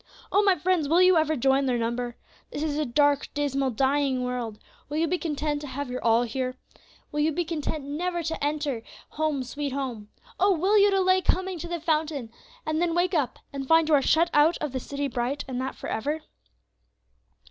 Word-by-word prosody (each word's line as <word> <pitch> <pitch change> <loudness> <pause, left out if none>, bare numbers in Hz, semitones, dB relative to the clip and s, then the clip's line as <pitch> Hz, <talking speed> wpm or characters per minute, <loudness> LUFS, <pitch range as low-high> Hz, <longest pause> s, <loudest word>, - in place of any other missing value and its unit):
"Oh! 405 - +4
my 395 -2 +4
friends, 335 -3 +1
will 335 +3 +4
you 365 0 +6
ever 315 -1 +2
join 270 +1 +2
their 250 -1 +1
number? 235 +1 -2 0.3
This 290 - -4
is 305 -2 -1
a 305 -1 -1
dark, 285 +3 +2
dismal, 275 -2 0
dying 265 +1 +1
world; 245 -4 -3 0.3
will 295 - -3
you 325 - +2
be 360 +2 0
content 300 -2 -2
to 295 - -6
have 275 -1 -5
your 250 - -4
all 230 +1 +4
here? 255 +2 -3 0.6
Will 295 - -2
you 305 +2 +3
be 345 +3 -1
content 310 -2 -3
never 345 +4 -2
to 325 -2 -3
enter 290 -4 -1 0.3
'Home, 300 -3 -1
sweet 280 +2 -4
Home'? 245 -7 -4 0.3
Oh! 385 -1 +4
will 385 +6 +2
you 405 +1 +6
delay 375 -1 +3
coming 370 -1 0
to 345 - -5
the 345 0 -3
fountain, 305 -6 -1 0.3
and 310 +1 0
then 340 -1 +1
wake 355 +2 +1
up, 290 -7 0 0.2
and 270 -1 -5
find 325 +1 +5
you - - +3
are 285 - +6
shut 335 +5 +3
out 305 +3 +4
of 300 - -3
the 260 - -2
city 280 +2 -3
bright, 270 +3 -2
and 255 -1 -3
that 265 +1 -4
for - - -7
ever? 295 +8 -2
295 Hz, 210 wpm, -26 LUFS, 265-325 Hz, 0.6 s, you